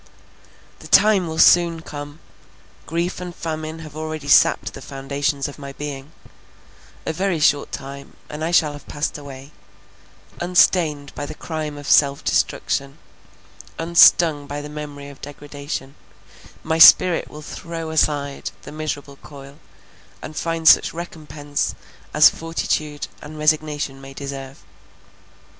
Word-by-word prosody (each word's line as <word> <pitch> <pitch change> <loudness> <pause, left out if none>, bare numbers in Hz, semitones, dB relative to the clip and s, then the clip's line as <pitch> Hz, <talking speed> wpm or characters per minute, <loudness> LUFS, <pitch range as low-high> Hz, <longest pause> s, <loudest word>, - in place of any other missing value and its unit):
The - - -11
time 205 -4 +5
will 160 0 -5
soon 170 -1 +5
come; 145 +1 -9 0.7
grief 170 +2 -2
and 175 -1 -7
famine 155 -1 -5
have 150 -1 -12
already 155 -2 -5
sapped 145 - +4
the - - -10
foundations 140 +1 -3
of 145 - -11
my 140 -1 -8
being; 145 0 -7 0.9
a 160 - -2
very 185 0 -1
short 145 -1 +2
time, 140 0 -8
and 150 +1 -6
I 165 - -1
shall 160 -4 +3
have 145 - -12
passed 145 0 -3
away; 140 0 -11 0.9
unstained 170 -5 +2
by 145 - -5
the - - -8
crime 155 -3 -5
of 145 -1 -9
self 140 -1 +4
destruction, 140 0 -1 0.8
unstung 165 -3 +5
by 145 +1 -5
the 145 0 -8
memory 145 -1 -8
of 140 - -14
degradation, 145 -1 -7 0.7
my 160 0 -1
spirit 175 +1 +7
will 150 0 -11
throw 165 0 -6
aside 145 -3 0
the - - -10
miserable 150 -2 -5
coil, 140 0 -13 0.6
and 155 - -9
find 165 0 -2
such - - +6
recompense 150 -4 -4 0.4
as - - +7
fortitude 155 -2 -2
and 155 +1 -10
resignation 150 -3 0
may 135 0 -11
deserve. 135 -3 -8
150 Hz, 135 wpm, -21 LUFS, 140-160 Hz, 0.9 s, spirit